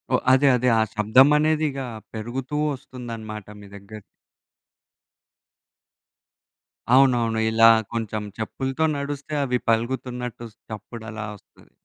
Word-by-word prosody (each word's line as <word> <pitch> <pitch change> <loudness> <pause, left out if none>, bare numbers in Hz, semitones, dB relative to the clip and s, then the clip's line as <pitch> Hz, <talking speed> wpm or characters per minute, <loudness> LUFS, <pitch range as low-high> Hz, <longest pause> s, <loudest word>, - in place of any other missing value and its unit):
ఓహ్! - - 0
అదే. 135 +2 +4
అదే. 125 +1 +1
ఆ - - +4
శబ్దమనేదిగా 140 +6 +3 0.3
పెరుగుతూ 125 +6 -4 0.2
వస్తుందనమాట 115 -5 -8
మీ 100 - -12
దగ్గర. 100 +2 -11 3.0
అవునవును. 120 -4 +3
ఇలా 115 0 +7 0.2
కొంచెం 110 -2 -3
చెప్పులతో 135 +7 -2
నడుస్తే 140 +1 -5
అవి 125 -1 0
పలుగుతున్నట్టు 125 0 -2 0.2
చప్పుడలా 110 0 -7
వస్తది. 100 - -22
120 Hz, 90 wpm, -23 LUFS, 110-135 Hz, 3.0 s, ఇలా